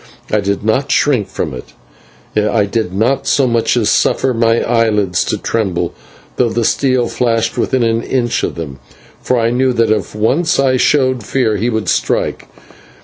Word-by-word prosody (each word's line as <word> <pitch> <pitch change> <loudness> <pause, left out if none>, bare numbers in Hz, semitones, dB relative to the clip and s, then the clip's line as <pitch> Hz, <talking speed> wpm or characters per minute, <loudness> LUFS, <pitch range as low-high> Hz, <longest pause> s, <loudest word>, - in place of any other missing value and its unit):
I 105 - +2
did 100 0 -2
not 130 +5 0
shrink 125 -9 +2
from 80 -5 -4
it; 60 - -10 0.6
I 105 0 +2
did 110 -2 -2
not 125 +8 0
so 140 - +3
much 120 0 +1
as 105 -3 +2
suffer 130 - +1
my 115 0 +2
eyelids 105 -6 +1
to - - -1
tremble, 90 -6 -2 0.4
though 120 - +2
the 115 0 -1
steel 130 -2 +1
flashed 115 -2 0
within 130 -2 0
an 115 0 +1
inch 120 -1 -1
of - - -3
them, 70 -5 -7 0.4
for 125 - 0
I 115 0 +1
knew 130 +1 +1
that 115 -2 +1
if 105 -1 -2
once 135 +11 +1
I 135 -1 +3
showed 130 -3 +2
fear 115 -1 0
he 115 +5 -1
would 110 -2 -2
strike. - - -1
115 Hz, 175 wpm, -15 LUFS, 105-125 Hz, 0.6 s, so